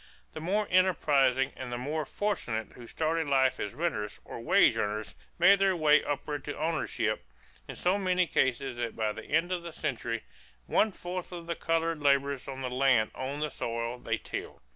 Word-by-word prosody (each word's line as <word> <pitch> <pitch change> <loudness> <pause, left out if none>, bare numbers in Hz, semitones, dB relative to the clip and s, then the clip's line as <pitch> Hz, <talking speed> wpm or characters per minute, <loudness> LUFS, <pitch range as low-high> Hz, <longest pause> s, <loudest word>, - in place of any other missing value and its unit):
The - - -6
more 200 +5 0
enterprising 145 -8 +3
and 130 -2 -6
the 120 - -2
more 150 +5 -2
fortunate 125 - -2
who 120 -2 -11
started 160 +1 -1
life 130 -2 +3
as 105 - -4
renters 130 -10 -2
or - - -7
wage 175 - +4
earners 105 -1 -2 0.2
made 195 +3 +6
their 195 -1 +3
way 155 -2 +5
upward 145 0 -3
to 145 - -5
ownership 160 0 -1 0.4
in - - -7
so 185 +3 +1
many 185 -1 +2
cases 130 -4 0
that 120 -1 -3
by 110 -1 0
the - - -8
end 165 +4 +1
of 180 -1 -1
the 170 0 -7
century, 120 -7 -3 0.4
one 215 - +3
fourth 180 -1 -6
of 170 -1 -7
the 170 - -2
colored 165 -1 0
laborers 140 -1 +2
on 135 -1 -6
the 130 - -2
land 125 -4 +3
owned 140 +3 -3
the 150 - -2
soil 115 +1 -3
they - - -1
tilled. - - -7
145 Hz, 185 wpm, -30 LUFS, 125-170 Hz, 0.4 s, made